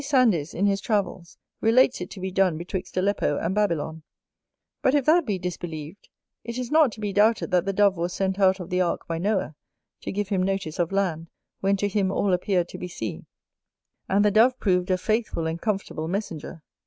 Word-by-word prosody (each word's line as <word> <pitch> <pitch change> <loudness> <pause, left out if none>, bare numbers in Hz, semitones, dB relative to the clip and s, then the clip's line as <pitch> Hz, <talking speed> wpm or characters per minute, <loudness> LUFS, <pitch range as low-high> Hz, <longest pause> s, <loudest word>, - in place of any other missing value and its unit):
Sandys, 235 - +2
in 195 - +1
his 200 -1 +1
Travels, 195 -5 -2 0.2
relates 235 -1 +4
it 180 - -5
to 195 - -9
be 190 0 -4
done 185 -3 +2
betwixt 180 +2 -5
Aleppo 185 -6 +1
and 170 - -1
Babylon, 165 -6 -1 0.8
But 265 - +3
if 285 -3 +2
that 320 -1 +4
be 205 -3 0
disbelieved, 175 -1 -6 0.3
it 235 +1 -6
is 250 -2 -4
not 305 -5 +5
to - - -11
be 205 -2 -3
doubted 215 +1 +3
that 180 0 +2
the 195 - 0
Dove 200 -1 +3
was 170 +1 -2
sent 190 +1 -1
out 190 -1 +4
of 180 0 -8
the 180 0 +2
ark 175 - -1
by 165 -1 -2
Noah, 195 -2 0 0.5
to - - -4
give 205 0 -2
him 195 -3 +1
notice 190 -4 -2
of 175 0 0
land, 170 -5 -1 0.3
when 195 +1 +1
to 205 - 0
him 195 -1 0
all 195 -1 +1
appeared 180 -1 +1
to - - -8
be 180 - -5
sea; 110 - -6 0.8
and 200 +2 +3
the 210 - +4
Dove 240 +5 +4
proved 180 -2 +1
a 185 - +3
faithful 215 -4 -1
and 165 +1 -3
comfortable 195 -7 -2
messenger. 165 -4 -5
190 Hz, 205 wpm, -25 LUFS, 175-210 Hz, 0.8 s, not